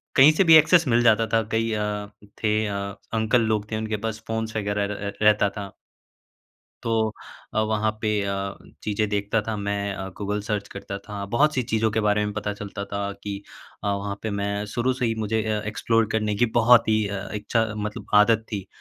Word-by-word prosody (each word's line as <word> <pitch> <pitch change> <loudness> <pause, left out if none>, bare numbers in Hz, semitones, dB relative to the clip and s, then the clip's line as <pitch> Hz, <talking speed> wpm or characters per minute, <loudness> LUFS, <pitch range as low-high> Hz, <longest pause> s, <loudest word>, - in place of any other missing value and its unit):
कहीं 140 +3 +8
से 195 - +3
भी 160 -1 +8
एक्सेस 160 0 +6
मिल 120 0 +4
जाता 115 -1 +4
था। 115 0 +2
कई 115 0 +1
अ, 105 -1 -2 0.4
थे 110 0 +2
अ, 100 - -3 0.4
अंकल 115 +2 +2
लोग 105 0 -3
थे 110 - -1
उनके 110 -1 -2
पास 110 0 -4
फ़ोन्स 110 0 -3
वग़ैरह 100 0 -1
र 100 0 -5
रहता 105 -1 +4
था। 100 -2 -6 1.1
तो 110 -1 +1 0.4
अ, - - +1
वहाँ 110 0 +1
पे 105 -1 +1
अ, 100 0 -3 0.3
चीज़ें 105 0 0
देखता 105 +1 0
था 110 - -1
मैं। 100 0 -2
अ, 95 -1 -5
गूगल 105 0 -2
सर्च 105 -1 -3
करता 100 0 -7
था 100 -1 -5
बहुत-सी 145 -2 +3
चीज़ों 110 -1 +2
के 110 - 0
बारे 105 0 +2
में 105 - -3
पता 105 0 -3
चलता 100 -1 -6
था 100 0 -2
कि 100 -1 -4 0.4
अ, 105 - -1
वहाँ 100 0 -2
पे 110 - -1
मैं 100 +1 -2
शुरू 125 +2 +1
से 125 -1 -1
ही 115 -1 0
मुझे 110 0 0
अ, 110 -1 -1
एक्सप्लोर 115 +1 +1
करने 105 -1 0
की 120 - +3
बहुत 115 0 +6
ही 110 -1 +2
अ, 100 0 -5
इच्छा 110 +2 0
मतलब 105 0 -5 0.2
आदत 110 0 +1
थी। 100 -2 -4
105 Hz, 200 wpm, -24 LUFS, 100-110 Hz, 1.1 s, कहीं